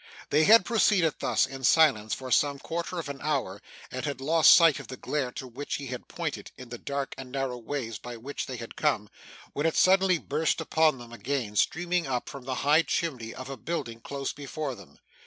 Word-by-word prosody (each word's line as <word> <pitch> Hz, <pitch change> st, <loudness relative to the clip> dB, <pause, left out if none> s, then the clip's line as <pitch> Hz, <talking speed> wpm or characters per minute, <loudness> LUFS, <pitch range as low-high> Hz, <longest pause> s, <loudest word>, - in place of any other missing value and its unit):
They 155 Hz, +2 st, +4 dB
had 220 Hz, -2 st, +7 dB
proceeded 200 Hz, -8 st, +3 dB
thus, -, -, +2 dB
in 135 Hz, -1 st, -9 dB
silence, 120 Hz, -8 st, +4 dB
for 130 Hz, -1 st, -8 dB
some 140 Hz, +3 st, +3 dB
quarter 170 Hz, +5 st, -4 dB
of 165 Hz, -4 st, -4 dB
an 140 Hz, -1 st, -7 dB
hour, 135 Hz, -10 st, -2 dB, 0.3 s
and 130 Hz, -, -4 dB
had 140 Hz, -3 st, -3 dB
lost 155 Hz, +3 st, +5 dB
sight 165 Hz, -4 st, +7 dB
of -, -, -10 dB
the 130 Hz, -, -8 dB
glare 140 Hz, -4 st, -2 dB
to -, -, -6 dB
which 125 Hz, +4 st, -5 dB
he 140 Hz, -, -5 dB
had 125 Hz, -1 st, -7 dB
pointed, -, -, -5 dB
in 125 Hz, -2 st, -10 dB
the 120 Hz, 0 st, -7 dB
dark 140 Hz, -1 st, -3 dB
and 130 Hz, -1 st, -8 dB
narrow 135 Hz, -2 st, -2 dB
ways 115 Hz, -3 st, -4 dB
by 120 Hz, -1 st, -8 dB
which 135 Hz, +5 st, -5 dB
they 130 Hz, -, -5 dB
had 115 Hz, -1 st, -8 dB
come, 120 Hz, -9 st, 0 dB, 0.4 s
when 145 Hz, +3 st, 0 dB
it 165 Hz, -, -1 dB
suddenly 190 Hz, -1 st, +5 dB
burst 155 Hz, +1 st, -1 dB
upon 155 Hz, -3 st, +2 dB
them 120 Hz, -1 st, -11 dB
again, 120 Hz, -3 st, -3 dB
streaming 175 Hz, -, +1 dB
up 125 Hz, -2 st, -2 dB
from 135 Hz, -2 st, -9 dB
the 130 Hz, -1 st, -2 dB
high 150 Hz, +3 st, +6 dB
chimney 130 Hz, -10 st, -2 dB
of 130 Hz, 0 st, -7 dB
a 135 Hz, -1 st, -6 dB
building 135 Hz, -9 st, -4 dB
close 140 Hz, +3 st, -4 dB
before 145 Hz, 0 st, -5 dB
them. -, -, -14 dB
140 Hz, 210 wpm, -28 LUFS, 125-155 Hz, 0.4 s, had